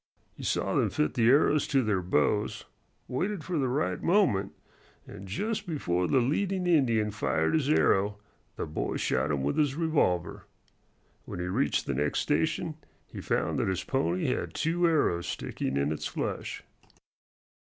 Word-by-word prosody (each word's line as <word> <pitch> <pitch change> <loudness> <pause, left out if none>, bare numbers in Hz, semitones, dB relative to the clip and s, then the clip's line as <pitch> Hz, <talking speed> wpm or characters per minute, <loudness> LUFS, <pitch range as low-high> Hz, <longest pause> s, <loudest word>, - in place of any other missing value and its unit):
He - - -12
saw - - -1
them - - +2
fit 75 - 0
the 115 -1 +3
arrows 145 +2 +4
to 135 -4 +2
their 105 -4 +1
bows, 90 +4 0 0.4
waited 185 +6 -2
for 175 -2 -2
the 135 - +1
right 140 +5 -1
moment, 150 - +2 0.5
and 100 - -10
just 210 - -3
before 90 - -1
the - - +2
leading 180 +9 0
Indian 120 -11 +2
fired 105 - 0
his 150 -3 +1
arrow 100 -8 +3 0.4
the - - -3
boy 75 - -3
shot 75 - 0
him 70 -3 -1
with 70 - 0
his 145 -3 +2
revolver. 145 - 0 0.8
When - - -7
he 90 - -2
reached 105 +10 0
the 70 - -2
next 75 +2 0
station 155 +1 0 0.3
he - - -9
found - - 0
that - - 0
his 95 -2 -1
pony 90 -10 0
had - - -3
two 170 +2 +1
arrows 115 - +1
sticking 65 +1 -3
in 70 +2 +1
its 75 - -3
flesh. - - -4
125 Hz, 165 wpm, -28 LUFS, -, 0.8 s, arrows